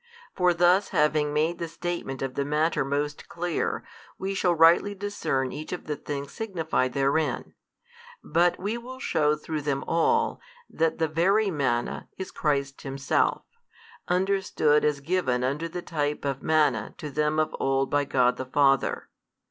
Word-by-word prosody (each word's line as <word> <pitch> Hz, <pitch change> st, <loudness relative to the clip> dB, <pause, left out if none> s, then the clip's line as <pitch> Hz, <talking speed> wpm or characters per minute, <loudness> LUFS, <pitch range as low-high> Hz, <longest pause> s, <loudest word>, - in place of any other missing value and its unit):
For 180 Hz, -1 st, +3 dB
thus 175 Hz, +3 st, +3 dB
having 150 Hz, 0 st, +2 dB
made 155 Hz, +3 st, 0 dB
the 170 Hz, -, -3 dB
statement 165 Hz, -5 st, -4 dB
of 135 Hz, -1 st, -3 dB
the 140 Hz, -, -1 dB
matter 150 Hz, +3 st, +1 dB
most 145 Hz, +2 st, -3 dB
clear, 175 Hz, -1 st, -2 dB, 0.3 s
we 195 Hz, +1 st, -3 dB
shall 180 Hz, -3 st, +2 dB
rightly 165 Hz, +5 st, +5 dB
discern 190 Hz, -10 st, -2 dB
each 155 Hz, -, -7 dB
of 180 Hz, -, -5 dB
the 150 Hz, -, -2 dB
things 140 Hz, -1 st, -5 dB
signified 165 Hz, -, -1 dB
therein. 140 Hz, +3 st, 0 dB, 0.7 s
But 175 Hz, +1 st, +2 dB
we 210 Hz, +5 st, -3 dB
will 255 Hz, +2 st, -9 dB
shew 150 Hz, -, +2 dB
through 155 Hz, 0 st, -4 dB
them 140 Hz, -1 st, -1 dB
all, 455 Hz, -, +1 dB, 0.3 s
that 160 Hz, 0 st, 0 dB
the 160 Hz, -, +1 dB
Very 195 Hz, +7 st, +2 dB
Manna 125 Hz, -6 st, -1 dB
is 190 Hz, -, -6 dB
Christ 140 Hz, -2 st, -1 dB
Himself, 135 Hz, 0 st, 0 dB, 0.6 s
understood 180 Hz, -5 st, +2 dB
as 150 Hz, -1 st, +1 dB
given 140 Hz, -6 st, 0 dB
under 145 Hz, +6 st, -1 dB
the 175 Hz, +1 st, -6 dB
type 150 Hz, -3 st, -2 dB
of 135 Hz, -1 st, -2 dB
manna 150 Hz, -9 st, +1 dB
to 155 Hz, -4 st, -6 dB
them 150 Hz, +2 st, 0 dB
of 155 Hz, -, 0 dB
old 135 Hz, 0 st, +1 dB
by 145 Hz, 0 st, +3 dB
God 125 Hz, -3 st, +2 dB
the 130 Hz, -, -4 dB
Father. 135 Hz, 0 st, +2 dB
155 Hz, 155 wpm, -26 LUFS, 140-175 Hz, 0.7 s, rightly